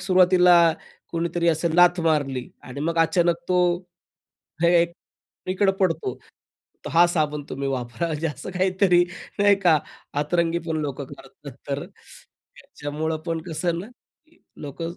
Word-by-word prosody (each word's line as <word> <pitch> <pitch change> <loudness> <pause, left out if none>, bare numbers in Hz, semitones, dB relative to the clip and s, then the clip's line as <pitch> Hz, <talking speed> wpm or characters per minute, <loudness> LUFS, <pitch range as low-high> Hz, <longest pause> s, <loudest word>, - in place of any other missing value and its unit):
सुरुवातीला 180 -1 +5 0.6
कोणीतरी 170 0 0
असं 165 +1 +1
लाथ 175 0 +5
मारली 145 -6 0 0.2
आणि 130 +2 -8
मग 165 +2 -1
अचानक 170 +1 +3
तो 185 - +1 1.1
हे 170 - +5
एक 170 0 -4 0.6
इकडं 195 +1 +2
पडतो, 190 - 0 0.7
"तर - - -5
हा 170 +1 +7
साबण 150 -3 -1
तुम्ही 140 +1 -3
वापरा," 125 +3 -3
म्हणजे 155 0 -2
असं 145 +4 -7
काहीतरी 185 -1 +3 0.4
नाही 205 0 +5
का, 160 -3 +6 0.4
अतरंगी 170 +2 0
पण 160 - -1
लोक 140 -1 -4
करतात. 135 - -12 0.2
तर - - -2
त्याच्यामुळं 155 +2 -8
पण 165 -1 -2
कसं 165 +3 -3
आहे 170 -1 0
ना, 190 - -6 0.4
की 330 +1 -28 0.2
लोक 145 +3 -7
170 Hz, 140 wpm, -23 LUFS, 150-180 Hz, 1.1 s, हा